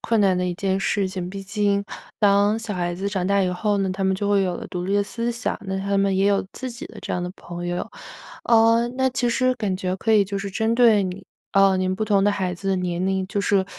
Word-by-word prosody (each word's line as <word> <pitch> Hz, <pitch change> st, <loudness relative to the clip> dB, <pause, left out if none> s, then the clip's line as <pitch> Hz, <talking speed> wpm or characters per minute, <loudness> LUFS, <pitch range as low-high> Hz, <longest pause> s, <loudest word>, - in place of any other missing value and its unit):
困 225 Hz, -1 st, +1 dB
难 190 Hz, -3 st, +3 dB
的 180 Hz, -, 0 dB
一 175 Hz, -, -2 dB
件 190 Hz, +1 st, -1 dB
事 195 Hz, 0 st, 0 dB
情。 185 Hz, -1 st, -5 dB
毕 195 Hz, +1 st, -7 dB
竟， 200 Hz, 0 st, 0 dB, 0.4 s
当 205 Hz, +1 st, +4 dB
小 225 Hz, -2 st, -5 dB
孩 175 Hz, -1 st, -2 dB
子 195 Hz, +3 st, -3 dB
长 190 Hz, -2 st, -2 dB
大 200 Hz, 0 st, +2 dB
以 185 Hz, -, +1 dB
后 205 Hz, +3 st, 0 dB
呢， 190 Hz, -1 st, 0 dB
他 190 Hz, +1 st, -2 dB
们 190 Hz, -, +2 dB
就 200 Hz, +2 st, -2 dB
会 200 Hz, -1 st, +3 dB
有 180 Hz, -2 st, -1 dB
了 -, -, -8 dB
独 180 Hz, 0 st, -4 dB
立 195 Hz, -, -1 dB
的 205 Hz, -, +3 dB
思 230 Hz, +3 st, -3 dB
想， 235 Hz, +1 st, -3 dB
那 190 Hz, -, -2 dB
他 200 Hz, 0 st, 0 dB
们 195 Hz, -1 st, +2 dB
也 195 Hz, -, +3 dB
有 200 Hz, -1 st, +2 dB
自 260 Hz, -1 st, -6 dB
己 245 Hz, +8 st, -8 dB
的 -, -, -13 dB
这 -, -, -5 dB
样 180 Hz, -, -1 dB
的 180 Hz, -, -4 dB
朋 175 Hz, 0 st, -7 dB
友。 175 Hz, 0 st, -3 dB, 0.5 s
呃， 230 Hz, +1 st, +4 dB
那 260 Hz, 0 st, +2 dB
其 245 Hz, -1 st, 0 dB
实 255 Hz, +2 st, +2 dB
感 205 Hz, -6 st, -2 dB
觉 185 Hz, 0 st, -2 dB
可 225 Hz, +3 st, 0 dB
以 205 Hz, -2 st, +5 dB
就 200 Hz, 0 st, -4 dB
是 200 Hz, 0 st, -5 dB
针 220 Hz, +4 st, 0 dB
对 230 Hz, -4 st, +5 dB
你 185 Hz, 0 st, -5 dB, 0.3 s
呃， 195 Hz, -1 st, +5 dB
您 185 Hz, 0 st, 0 dB
不 215 Hz, +3 st, -2 dB
同 200 Hz, -2 st, +2 dB
的 205 Hz, -, +4 dB
孩 190 Hz, -3 st, -2 dB
子 195 Hz, +3 st, -5 dB
的 190 Hz, -, +2 dB
年 180 Hz, 0 st, -2 dB
龄， 190 Hz, -1 st, 0 dB
就 200 Hz, +1 st, -2 dB
是， 200 Hz, -1 st, +2 dB
195 Hz, 290 characters per minute, -23 LUFS, 185-210 Hz, 0.5 s, 以